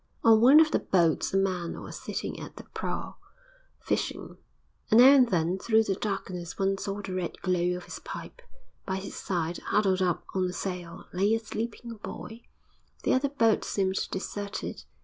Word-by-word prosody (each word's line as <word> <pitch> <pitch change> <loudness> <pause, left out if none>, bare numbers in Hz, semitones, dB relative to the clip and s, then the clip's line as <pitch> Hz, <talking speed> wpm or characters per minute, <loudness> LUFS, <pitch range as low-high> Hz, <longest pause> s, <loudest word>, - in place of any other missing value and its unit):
On 220 -1 +6
one 270 +6 +8
of 320 0 +5
the - - +2
boats 170 -4 +2
a 195 - +2
man 185 -3 -1
was - - -8
sitting - - -4
at - - -9
the - - -9
prow, - - -5 0.6
fishing, - - -3 0.5
and 220 - +6
now 255 +2 +10
and 255 -4 +6
then, 175 0 +1
through 225 +1 +3
the 200 - 0
darkness, 185 -4 -4
one 195 0 +1
saw 200 +1 -4
the 190 - -5
red 185 -2 -3
glow 180 -1 +1
of 180 - -9
his - - -8
pipe; - - -8 0.4
by 190 - -2
his 190 +1 -6
side, 175 -2 -2
huddled 190 -3 +1
up 180 -3 0
on 185 -1 +1
a 180 - -3
sail, 180 -2 -5
lay 200 +4 +3
a - - -1
sleeping 225 +1 -5
boy. 225 +3 -8 0.6
The - - +2
other 270 +2 +2
boat 230 -6 +2
seemed 190 -1 -1
deserted. 200 +1 -5
195 Hz, 180 wpm, -28 LUFS, 180-225 Hz, 0.6 s, now